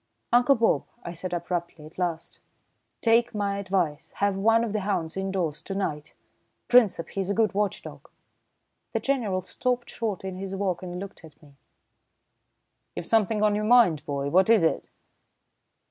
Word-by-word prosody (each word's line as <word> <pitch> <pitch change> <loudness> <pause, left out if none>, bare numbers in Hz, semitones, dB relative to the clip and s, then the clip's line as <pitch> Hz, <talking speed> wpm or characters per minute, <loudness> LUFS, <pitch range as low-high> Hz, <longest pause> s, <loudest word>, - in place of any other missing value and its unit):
"Uncle 245 +3 +5
Bob," 230 -2 +2 0.2
I 170 - -5
said 175 +2 -6
abruptly 170 -2 -4
at 155 +4 -13
last, 170 -2 -3 0.6
"take 230 0 +3
my 200 -1 -1
advice. 185 -7 -2
Have 200 -1 0
one 225 +4 +3
of 225 -3 -3
the 215 - 0
hounds 190 -5 -2
indoors 190 -5 -2
to 195 - -6
night 155 -6 -4 0.5
Princep, 215 -9 +4
he's 195 -1 -3
a 200 - 0
good 220 -2 +2
watch 205 0 -1
dog." - - -11 0.8
The - - +1
General 220 -9 -1
stopped 245 +5 -2
short 215 -5 -3
in 190 -1 -5
his 195 0 -5
walk 190 -3 -1
and 180 -1 -6
looked 200 -2 -9
at 155 -3 -15
me. 145 -2 -19 1.4
"You've - - -5
something 215 +1 +2
on 210 -1 +4
your 210 +1 -1
mind, 215 -10 +4
boy. 140 -1 -2
What 190 +4 +4
is 225 -6 +5
it?" 160 - 0
195 Hz, 165 wpm, -26 LUFS, 170-215 Hz, 1.4 s, Uncle